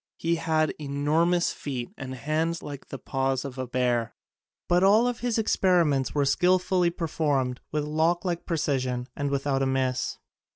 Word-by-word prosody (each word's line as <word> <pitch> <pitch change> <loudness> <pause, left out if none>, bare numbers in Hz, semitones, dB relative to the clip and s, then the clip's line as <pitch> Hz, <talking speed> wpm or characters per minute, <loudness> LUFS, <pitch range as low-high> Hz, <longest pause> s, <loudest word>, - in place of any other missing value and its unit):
He 165 0 0
haid 160 -1 +1
enormous 155 +5 +1
feet 125 -4 -5
and 130 -1 -6
hands 155 +6 -1
like 145 -2 -8
the 135 - -6
paws 135 0 -1
of 135 -1 -7
a 130 - -3
bear, 120 -2 0 0.5
but 175 +1 +3
all 210 +5 +5
of 245 -1 -2
his 240 -2 -1
experiments 175 - +2
were 145 -1 +2
skillfully 180 +3 +3
per 170 0 -4
formed 140 -6 0
with 150 -1 0
clock 160 +4 +1
like 175 -2 -2
precision 130 -6 -1
and 145 0 -2
with 140 0 -2
out 135 -2 +1
a 135 - +2
miss. 130 -1 -1
150 Hz, 170 wpm, -26 LUFS, 135-170 Hz, 0.5 s, all